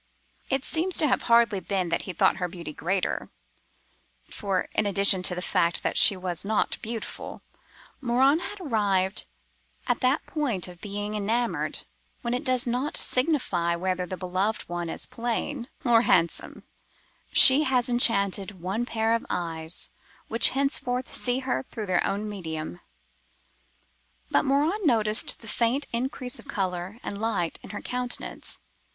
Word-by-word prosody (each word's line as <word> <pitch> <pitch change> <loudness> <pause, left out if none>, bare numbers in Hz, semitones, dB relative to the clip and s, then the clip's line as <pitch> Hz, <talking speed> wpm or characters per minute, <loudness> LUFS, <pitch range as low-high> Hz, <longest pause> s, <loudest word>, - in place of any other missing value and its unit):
It 270 0 0
seems 345 +3 +1
to 305 - +5
have 255 - +1
hardly 230 -4 +5
been 185 -1 -2
that 170 - 0
he - - -1
thought - - +3
her 180 -1 -1
beauty 170 -3 -8
greater: 180 +5 -2 1.0
for, 195 -3 -1
in 210 - +1
addition 200 -1 +5
to 180 0 +5
the 180 - -4
fact 170 -1 +1
that - - -1
she 200 - +6
was 180 -2 -4
not 215 +1 0
beautiful, 225 -1 -6 0.6
Morin 265 +4 +3
had 410 +3 -7
arrived 205 - 0 0.6
at - - 0
that 260 +2 +1
point 250 - -2
of 175 -2 -13
being 205 +1 -4
enamoured 225 +3 -1 0.4
when 235 0 -1
it 250 - -2
does 255 -3 +2
not 250 +4 0
signify 250 - +2
whether 180 +1 -2
the 185 - -5
beloved 185 +4 -1
one 175 -1 -4
is - - -4
plain 240 +2 -3 0.2
or 235 -2 +5
handsome—she 245 - +2
has 250 -2 +2
enchanted 200 -5 +2
one 195 +7 -2
pair 225 -1 0
of 230 - 0
eyes, 165 -1 -4 0.4
which 230 +1 +5
henceforward 260 -2 -1
see 250 +1 -2
her 255 - -1
through 220 - -5
their 185 -2 +1
own 205 +2 -2
medium. 160 - -6 1.5
But - - +3
Morin 300 +10 +1
noticed 220 -7 +1
the 225 - -11
faint 240 +6 +1
increase 250 +1 -3
of - - -14
colour 190 -4 -3
and 200 +1 -5
light 200 -7 -1
in - - -12
her 205 - -6
countenance. 250 0 -5
215 Hz, 150 wpm, -26 LUFS, 185-250 Hz, 1.5 s, she